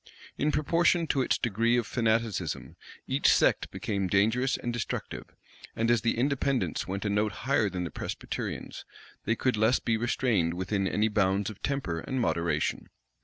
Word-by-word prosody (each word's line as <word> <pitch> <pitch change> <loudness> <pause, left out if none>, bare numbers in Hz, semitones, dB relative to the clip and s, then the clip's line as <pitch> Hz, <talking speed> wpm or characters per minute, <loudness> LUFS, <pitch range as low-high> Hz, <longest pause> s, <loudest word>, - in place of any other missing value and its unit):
In 150 - +1
proportion 170 +3 +2
to 140 -3 +1
its - - +1
degree 115 +1 +1
of 120 - 0
fanaticism, 110 - -1 0.3
each - - +3
sect - - +3
became 100 -3 -2
dangerous 110 +8 +2
and 120 - -4
destructive; 120 -2 -4 0.5
and 115 +1 +1
as 120 -2 +3
the 115 - 0
Independents 135 0 0
went 100 +3 -4
a - - +1
note 105 +1 +1
higher 120 -6 +2
than 90 -1 -3
the 85 - -5
Presbyterians, - - -5 0.4
they 115 - +1
could 125 -1 0
less 110 +4 +4
be 110 -1 0
restrained 110 -7 +1
within 95 +2 -1
any 105 +3 +1
bounds 100 -1 +1
of 105 - -14
temper 135 -13 -2
and 130 +9 -3
moderation. 85 -9 -1
110 Hz, 165 wpm, -28 LUFS, 100-125 Hz, 0.5 s, less